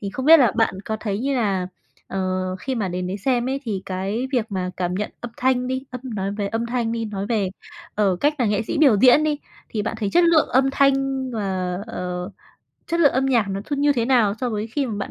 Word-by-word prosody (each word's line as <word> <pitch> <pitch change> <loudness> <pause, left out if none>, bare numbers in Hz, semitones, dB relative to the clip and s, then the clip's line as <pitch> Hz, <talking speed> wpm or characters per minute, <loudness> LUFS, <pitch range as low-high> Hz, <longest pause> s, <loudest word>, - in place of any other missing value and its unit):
Thì 200 - -4
không 260 +6 -4
biết 325 +1 +9
là 240 -6 +4
bạn 225 -4 +2
có 220 - -2
thấy 205 -2 -2
như 275 +3 -1
là, 195 -6 0 0.4
ờ, 195 - -3 0.4
khi 260 +8 -4
mà 210 -5 -1
đến 180 0 -3
đấy 185 - -3
xem 245 +2 0
ấy 270 +1 -2
thì 205 -6 -3
cái 195 +6 -2
việc 240 -4 +1
mà 185 -1 -2
cảm 180 -1 -1
nhận 205 +2 -2
âm 240 - -6
thanh 255 -1 +1
đi, 260 +1 -3
âm 250 - -6
nói 195 -1 -2
về 205 -1 -2
âm 225 +3 -2
thanh 235 -1 -1
đi, 230 -1 -2
nói 200 -2 -4
về, 210 -4 0 0.5
ờ, 200 -3 +2
cách 295 +1 +2
là 245 - +2
nghệ 205 0 +1
sĩ 220 - -3
biểu 275 -8 +6
diễn 260 +5 +6
đi, 300 -1 0 0.3
thì 215 - -2
bạn 225 - -3
thấy 205 -2 -1
chất 350 0 +5
lượng 335 -3 +4
âm 265 +1 +3
thanh 275 0 +4 0.4
và, 190 -4 -2
ờ, 180 -2 -4 0.6
chất 335 0 0
lượng 290 -4 +5
âm 265 +1 +1
nhạc 240 -6 +2
nó 195 0 -3
thư 285 - -3
như 290 +1 +3
thế 235 -4 0
nào 235 -5 +3
so 250 -2 -1
với 215 0 -2
khi 270 +4 -2
mà 225 - -4
bạn 200 - -4
225 Hz, 255 wpm, -22 LUFS, 200-260 Hz, 0.6 s, biết